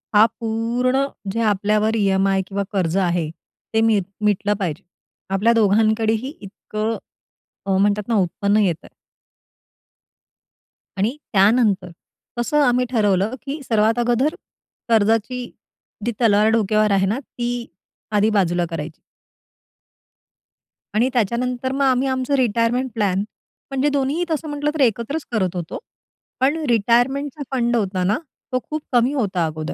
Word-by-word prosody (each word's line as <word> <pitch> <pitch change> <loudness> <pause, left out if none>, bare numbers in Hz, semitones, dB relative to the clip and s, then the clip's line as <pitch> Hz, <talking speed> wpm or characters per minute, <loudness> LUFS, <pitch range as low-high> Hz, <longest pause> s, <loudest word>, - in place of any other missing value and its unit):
हा 210 +1 +8
पूर्ण 240 +4 0 0.3
जे 230 - -3
आपल्यावर 210 +2 +1
ई-एम-आय 195 -2 +2
किंवा 200 0 -2
कर्ज 185 -3 0
आहे 175 -4 0 0.4
ते 220 - +3
मी 225 -2 +4 0.3
मिटलं 205 0 +2
पाहिजे. 180 -1 -3 0.5
आपल्या 210 +5 +3
दोघांकडेही 220 +3 +2
इतकं" 215 +2 -4 0.8
म्हणतात 205 0 +1
ना 235 - +1
"उत्पन्न 200 +3 0
येतंय." 175 -5 -2 2.0
आणि 215 +7 0 0.2
त्यानंतर 200 -2 +3 0.5
तसं 295 +5 +2
आम्ही 250 -1 +3
ठरवलं, 205 -1 +1
की 285 +3 -5
सर्वात 225 -1 +2
अगोदर 245 +5 +1 0.5
कर्जाची 225 +3 +2 0.6
जी 240 - +1
तलवार 215 -2 +4
डोक्यावर 215 -1 +2
आहे 195 -1 +3
ना, 220 +7 0
ती 240 -3 -5 0.7
आधी 210 +1 +4
बाजूला 175 -4 +1
करायची. 160 -1 -6 2.0
आणि 235 +4 +3
त्याच्यानंतर 245 +3 0
मग 275 +1 -2
आम्ही 260 0 +2
आमचं 260 +1 -1
रिटायरमेंट 240 +2 +1
प्लॅन 200 -4 +1 0.5
म्हणजे 270 +2 +1
दोन्हीही 285 +4 0
तसं 315 0 -2
म्हटलं, 290 0 -1
तर 310 - -2
एकत्रच 245 +5 0
करत 190 -6 0
होतो. 170 -2 -4 0.6
पण 280 +4 +3
रिटायरमेंटचा 250 +6 +1
फंड 240 -1 +1
होता 190 -5 0
ना, 205 +5 +2 0.3
तो 255 - +1
खूप 310 0 -3
कमी 245 +3 +3
होता 195 - 0
अगोदर. 155 0 -4
225 Hz, 125 wpm, -21 LUFS, 200-250 Hz, 2.0 s, हा